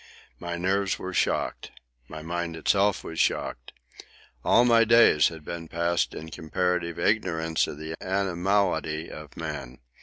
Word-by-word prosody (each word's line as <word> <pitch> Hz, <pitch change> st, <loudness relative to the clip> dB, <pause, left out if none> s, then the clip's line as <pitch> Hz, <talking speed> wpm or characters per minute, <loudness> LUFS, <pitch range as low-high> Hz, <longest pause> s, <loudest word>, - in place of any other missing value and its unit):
My 85 Hz, 0 st, -4 dB
nerves 95 Hz, +2 st, 0 dB
were 95 Hz, 0 st, -6 dB
shocked. -, -, -1 dB, 0.4 s
My 80 Hz, 0 st, -8 dB
mind 85 Hz, 0 st, -3 dB
itself 100 Hz, +5 st, +2 dB
was 80 Hz, -, -6 dB
shocked. -, -, -1 dB, 0.7 s
All 120 Hz, -, +5 dB
my 115 Hz, -1 st, +5 dB
days 115 Hz, -10 st, +6 dB
had 80 Hz, -2 st, -8 dB
been 85 Hz, -1 st, -6 dB
passed 85 Hz, +1 st, 0 dB
in 80 Hz, +1 st, -8 dB
comparative 85 Hz, +1 st, -1 dB
ignorance 80 Hz, -7 st, +1 dB
of -, -, -7 dB
the 80 Hz, +1 st, -6 dB
animality 95 Hz, -4 st, 0 dB
of 75 Hz, -2 st, -11 dB
man. 60 Hz, +1 st, -6 dB
85 Hz, 140 wpm, -26 LUFS, 80-95 Hz, 0.7 s, days